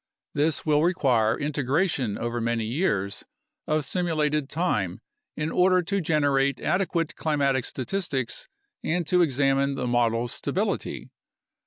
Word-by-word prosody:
This 150 +1 +1
will 150 -1 +3
require 125 -10 +2
integration 145 - 0
over 120 0 -2
many 115 -1 0
years 105 - -1 0.4
of 155 0 +2
simu 170 +3 -1
lated 150 -2 +1
time 105 - -1 0.4
in 155 +1 -1
order 185 0 +4
to 200 +3 -1
generate 145 -4 +2
adequate 170 -4 0
climatic 140 -5 +1
statistics 135 -3 -3 0.4
and 175 +1 0
to 180 +3 +3
examine 140 -2 +2
the - - -2
models' 120 -1 +1
stability. - - -2
145 Hz, 125 wpm, -26 LUFS, 120-165 Hz, 0.4 s, order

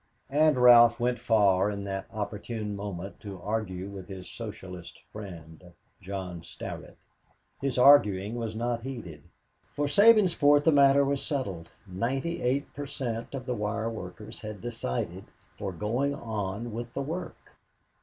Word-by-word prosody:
And 150 0 +4
Ralph 120 -1 +7
went 120 +1 0
far 100 -3 +3
at 100 -1 -4
that 95 -1 -4
opportune 105 0 -4
moment 100 -2 -6
to 100 -3 -8
argue 95 -2 -3
with 100 -1 -9
his 95 -1 -8
Socialist 95 -6 -8
friend, 90 -4 -10 0.3
John 95 -3 -5
Starrett. 85 - -8 0.6
His 135 -2 -1
arguing 110 -7 +6
was 115 -2 -4
not 120 +1 -1
heeded. 115 - -7 0.5
For 145 - 0
Sabinsport 170 -5 +5
the 160 - +5
matter 140 -1 +6
was 140 0 -1
settled 95 - -3 0.2
ninety 130 - -2
eight 135 +4 0
per 145 0 -6
cent, 120 -3 -4
of 130 -2 -6
the 125 - -1
wire 110 +1 -2
workers 105 0 -8
had 105 -2 -7
decided 115 - -3 0.3
for 100 -2 -4
going 120 +10 -1
on 110 0 -4
with 120 +1 -6
the 140 - -1
work. 165 +6 -7
110 Hz, 145 wpm, -28 LUFS, 95-135 Hz, 0.6 s, Ralph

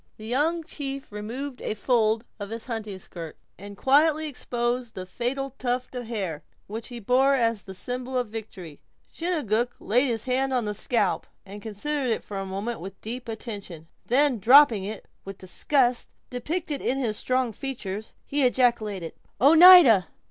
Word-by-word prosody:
The 215 - -10
young 305 +8 0
chief 275 -5 -6
removed 245 +6 -6
a - - -3
fold 225 0 +1
of 200 -1 -6
his 225 0 -5
hunting 220 -5 -5
skirt, 170 -3 -9 0.2
and 200 0 -10
quietly 310 +5 +3
exposed 245 -3 -3
the 185 - -5
fatal 255 +8 -3
tuft 250 0 -2
of 245 -2 -6
hair, 190 -10 -4 0.2
which 220 +2 -7
he 245 -2 -8
bore 260 +5 +3
as 230 -4 +1
the 190 0 -10
symbol 250 +6 -4
of 250 -2 0
victory. 195 -8 -9 0.3
Chingachgook 245 - -1
laid 250 +6 +2
his 230 -3 -2
hand 265 +1 0
on 245 -3 +1
the 210 - -1
scalp, 215 -1 0 0.2
and 205 +1 -10
considered 255 +6 -3
it 225 - -1
for 200 - -7
a 195 0 -3
moment 200 +5 -4
with 195 +2 -9
deep 240 +2 -7
attention. 200 -8 -7 0.2
Then 260 -1 +3
dropping 235 -2 +6
it, 210 +1 -7 0.2
with 195 0 -8
disgust 245 +6 0 0.2
depicted 300 +4 -3
in 265 - 0
his 235 -6 -1
strong 255 +1 0
features, 215 -5 -6
he 290 +1 -1
ejaculated: 225 -8 +1 0.3
"Oneida!" 315 - +8
240 Hz, 165 wpm, -25 LUFS, 210-265 Hz, 0.3 s, Oneida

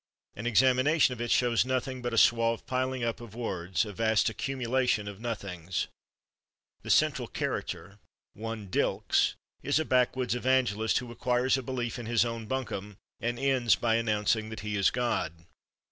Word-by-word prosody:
An 110 +3 -4
examination 130 +4 +4
of 120 - -7
it 120 - -2
shows 120 -1 +3
nothing 130 0 -2
but 120 0 -2
a 115 - -2
suave 115 0 +3
piling 130 0 -1
up 115 0 -2
of 115 -3 -11
words, 95 -5 -1
a 105 - -7
vast 110 +2 +2
accumulation 125 -1 -1
of 100 -1 -7
nothings. 95 -7 -4 0.9
The - - -9
central - - +3
character, 95 +5 -4 0.3
one 115 -1 -6
Dylks, 90 - +1 0.3
is 145 +2 +1
a 160 - +1
backwoods 125 -1 +1
evangelist 125 -4 +1
who 125 -2 -4
acquires 125 +2 +1
a 135 - -1
belief 125 -2 -3
in 120 - -6
his 120 0 +3
own 115 -2 -4
buncombe, 105 -6 -4 0.2
and 120 0 -2
ends 130 -3 +3
by 115 -2 +1
announcing 110 -1 +1
that 110 -2 -7
he 105 -1 -3
is 100 -1 +4
God. 85 -9 -2
115 Hz, 160 wpm, -29 LUFS, 105-125 Hz, 0.9 s, examination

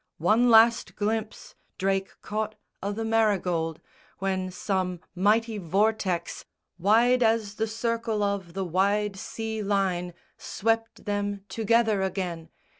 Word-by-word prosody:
One 220 +9 +3
last 225 0 +5
glimpse 215 +1 -3 0.2
Drake 195 0 -1
caught 215 +1 -3 0.3
o' 200 - -2
the 225 +2 -3
Marygold, 185 -8 +1 0.4
when 190 -1 -1
some 185 -1 -2
mighty 215 +4 +2
vortex 195 0 0 0.4
Wide 235 +7 +4
as 220 -3 +2
the 220 +1 -1
circle 225 -1 -1
of 200 -4 -2
the 195 -1 -2
wide 200 +3 +1
sea 220 +2 -5
line 190 -4 0 0.2
Swept 225 +1 -2
them 205 -1 -2
together 220 0 +2
again. 180 -4 -3
205 Hz, 115 wpm, -27 LUFS, 190-225 Hz, 0.4 s, last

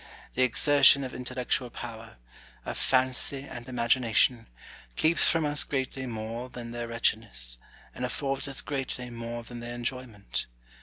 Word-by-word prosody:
The 130 - 0
exertion 140 +2 +6
of 130 - -5
intellectual 125 0 -2
power, 115 - -8 0.5
of - - -3
fancy 130 +1 +1
and 120 +1 -8
imagination, 120 -1 +2 0.5
keeps 165 +2 +5
from 165 -2 +2
us 150 0 +3
greatly 130 -1 -3
more 115 +2 -5
than 120 -2 -7
their 120 0 -4
wretchedness, 105 - 0 0.3
and 125 - -6
affords 135 +3 -1
us 135 - +1
greatly 130 -3 -3
more 115 0 -5
than 120 +1 -9
their 120 0 -5
enjoyment. 120 -4 -4
125 Hz, 140 wpm, -29 LUFS, 115-130 Hz, 0.5 s, exertion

